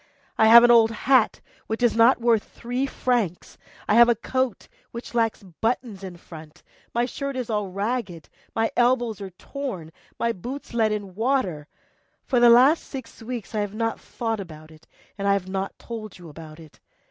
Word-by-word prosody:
I 220 Hz, -, +4 dB
have 235 Hz, +1 st, +9 dB
an 240 Hz, -, +6 dB
old 230 Hz, -2 st, +6 dB
hat 250 Hz, +2 st, +2 dB, 0.3 s
which 220 Hz, +2 st, -3 dB
is 240 Hz, -, +3 dB
not 230 Hz, +3 st, +5 dB
worth 230 Hz, -2 st, +3 dB
three 245 Hz, +3 st, -4 dB
francs, 235 Hz, -10 st, -2 dB, 0.3 s
I -, -, +2 dB
have 235 Hz, +2 st, +7 dB
a 240 Hz, -, +4 dB
coat 260 Hz, +1 st, -2 dB, 0.2 s
which 235 Hz, +1 st, -9 dB
lacks 225 Hz, -3 st, 0 dB
buttons 210 Hz, +3 st, -3 dB
in 185 Hz, -2 st, -8 dB
front, 155 Hz, -2 st, -13 dB, 0.3 s
my 240 Hz, +1 st, +1 dB
shirt 275 Hz, +2 st, -5 dB
is 245 Hz, -3 st, -4 dB
all 210 Hz, -2 st, -1 dB
ragged, 200 Hz, -, -4 dB, 0.3 s
my 225 Hz, 0 st, +1 dB
elbows 240 Hz, -3 st, +1 dB
are 195 Hz, -, -6 dB
torn, 190 Hz, -, -7 dB, 0.3 s
my 235 Hz, -, +1 dB
boots 245 Hz, +7 st, -8 dB
let 220 Hz, -2 st, +2 dB
in 210 Hz, -1 st, -1 dB
the 190 Hz, -2 st, -13 dB
water; 200 Hz, -, -1 dB, 0.6 s
for 250 Hz, -, +1 dB
the 240 Hz, 0 st, +7 dB
last 260 Hz, +7 st, +6 dB
six 260 Hz, -5 st, -9 dB
weeks 235 Hz, -1 st, -6 dB
I 215 Hz, -, -1 dB
have 205 Hz, 0 st, -3 dB
not 225 Hz, 0 st, -2 dB
thought 225 Hz, -2 st, -4 dB
about 155 Hz, -4 st, -10 dB
it, 155 Hz, 0 st, -19 dB, 0.3 s
and 200 Hz, -, -1 dB
I 200 Hz, -, +4 dB
have 195 Hz, -2 st, -2 dB
not 190 Hz, +1 st, -4 dB
told 220 Hz, -3 st, -8 dB
you 175 Hz, -2 st, -12 dB
about 155 Hz, +1 st, -12 dB
it. 160 Hz, -2 st, -16 dB
225 Hz, 190 wpm, -24 LUFS, 190-240 Hz, 0.6 s, have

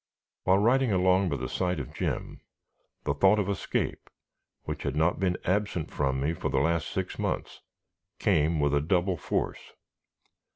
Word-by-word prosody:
While 95 Hz, +1 st, +5 dB
riding 120 Hz, +4 st, +3 dB
along 95 Hz, 0 st, +3 dB
by 70 Hz, -, -1 dB
the -, -, -4 dB
side 90 Hz, -3 st, -1 dB
of 65 Hz, -, -7 dB
Jim, -, -, -3 dB, 0.6 s
the 70 Hz, -, 0 dB
thought 95 Hz, +8 st, +4 dB
of 105 Hz, -3 st, 0 dB
escape 100 Hz, -2 st, -2 dB, 0.5 s
which -, -, -5 dB
had 70 Hz, -, -2 dB
not 80 Hz, +3 st, +2 dB
been 90 Hz, -2 st, +1 dB
absent 95 Hz, -3 st, 0 dB
from 65 Hz, -2 st, 0 dB
me 75 Hz, +4 st, 0 dB
for -, -, -3 dB
the -, -, 0 dB
last 80 Hz, +4 st, +1 dB
six -, -, -4 dB
months -, -, -3 dB, 0.6 s
came 80 Hz, +1 st, +2 dB
with 75 Hz, +1 st, +1 dB
double 90 Hz, 0 st, +2 dB
force. 80 Hz, -, -3 dB
90 Hz, 160 wpm, -28 LUFS, 75-95 Hz, 0.6 s, While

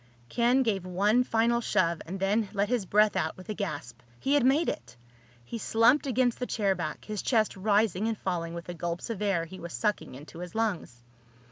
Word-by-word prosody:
Ken 245 Hz, +3 st, +3 dB
gave 200 Hz, -6 st, 0 dB
one 200 Hz, +7 st, +2 dB
final 235 Hz, 0 st, +2 dB
shove 170 Hz, -7 st, +1 dB
and 190 Hz, +3 st, -5 dB
then 200 Hz, +2 st, +1 dB
let 200 Hz, 0 st, 0 dB
his 240 Hz, -6 st, 0 dB
breath 210 Hz, +1 st, +4 dB
out 160 Hz, -4 st, -1 dB
with 185 Hz, +3 st, -12 dB
a -, -, -1 dB
gasp. 155 Hz, -, -5 dB, 0.2 s
He 275 Hz, -, 0 dB
had 290 Hz, -, +4 dB
made 280 Hz, +6 st, +3 dB
it! 120 Hz, -, -5 dB, 0.5 s
He 230 Hz, -, -6 dB
slumped 235 Hz, +7 st, +3 dB
against 250 Hz, -1 st, +1 dB
the 250 Hz, -, -2 dB
chair 200 Hz, -3 st, +1 dB
back, 160 Hz, -5 st, -5 dB
his 210 Hz, -2 st, -4 dB
chest 220 Hz, -4 st, +1 dB
rising 205 Hz, 0 st, +1 dB
and 225 Hz, -1 st, -1 dB
falling 170 Hz, -3 st, -3 dB
with 170 Hz, -, -6 dB
the 175 Hz, -, -6 dB
gulps 170 Hz, +4 st, -4 dB
of 210 Hz, -3 st, -5 dB
air 195 Hz, -5 st, +1 dB
he 185 Hz, +3 st, -10 dB
was 170 Hz, -1 st, -7 dB
sucking 130 Hz, -, -2 dB
into 150 Hz, +4 st, -11 dB
his 180 Hz, +2 st, -8 dB
lungs. 185 Hz, -, -2 dB
205 Hz, 210 wpm, -28 LUFS, 175-225 Hz, 0.5 s, breath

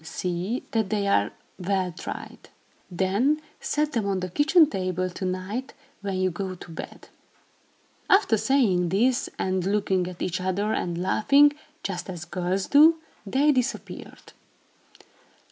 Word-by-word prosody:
See 180 Hz, +8 st, -3 dB
that 220 Hz, -4 st, 0 dB
they 205 Hz, -1 st, 0 dB
are 105 Hz, -, +2 dB, 0.3 s
well 185 Hz, -1 st, -1 dB
dried. -, -, -8 dB, 0.4 s
Then 200 Hz, -, +1 dB, 0.2 s
set 300 Hz, 0 st, -1 dB
them 225 Hz, -6 st, -1 dB
on 195 Hz, -1 st, 0 dB
the 185 Hz, -, -3 dB
kitchen 310 Hz, -, +5 dB
table 185 Hz, -, -2 dB
to 185 Hz, -, -5 dB
night, 185 Hz, +8 st, -4 dB, 0.3 s
when 195 Hz, -2 st, -3 dB
you 185 Hz, 0 st, +1 dB
go 185 Hz, +2 st, -4 dB
to 175 Hz, -, -12 dB
bed." 165 Hz, -, -9 dB, 1.0 s
After 385 Hz, -, +5 dB
saying 205 Hz, -8 st, +2 dB
this, 240 Hz, +8 st, +1 dB
and 185 Hz, -1 st, -1 dB
looking 190 Hz, -2 st, 0 dB
at 180 Hz, -1 st, -6 dB
each 185 Hz, +1 st, -2 dB
other 200 Hz, +4 st, 0 dB
and 170 Hz, -1 st, -2 dB
laughing, 280 Hz, +10 st, +4 dB, 0.3 s
just 185 Hz, -1 st, -4 dB
as 175 Hz, -2 st, -6 dB
girls 180 Hz, +2 st, -2 dB
do, 315 Hz, +3 st, +6 dB, 0.3 s
they 280 Hz, +8 st, +3 dB
disappeared. 260 Hz, -1 st, -4 dB
195 Hz, 140 wpm, -25 LUFS, 185-250 Hz, 1.0 s, do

